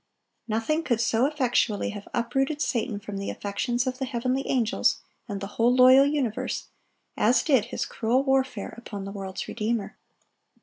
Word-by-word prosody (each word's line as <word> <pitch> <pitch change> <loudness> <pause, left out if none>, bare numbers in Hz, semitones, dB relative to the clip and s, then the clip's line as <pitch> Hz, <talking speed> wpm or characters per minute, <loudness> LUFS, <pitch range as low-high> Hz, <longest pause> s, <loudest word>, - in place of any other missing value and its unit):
Nothing 230 +9 0
could 240 -8 0
so 230 +2 +2
effectually 250 -7 0
have 205 -1 -9
uprooted 270 +5 0
Satan 230 -6 -1
from 205 -1 -7
the 200 - -4
affections 240 +5 -2
of 255 0 -3
the 265 - -1
heavenly 255 +2 -1
angels 235 -4 +1 0.3
and 200 -1 -3
the 200 - -5 0.2
whole 235 +2 +5
loyal 260 +2 +7
universe, 275 -7 -2 0.5
as 230 +5 +3
did 265 -9 +3
his 240 - -3
cruel 240 +4 0
warfare 265 -5 0
upon 205 -4 -7
the 195 - -6
world's 195 -2 -6
Redeemer. 220 -1 -2
240 Hz, 160 wpm, -26 LUFS, 210-265 Hz, 0.5 s, loyal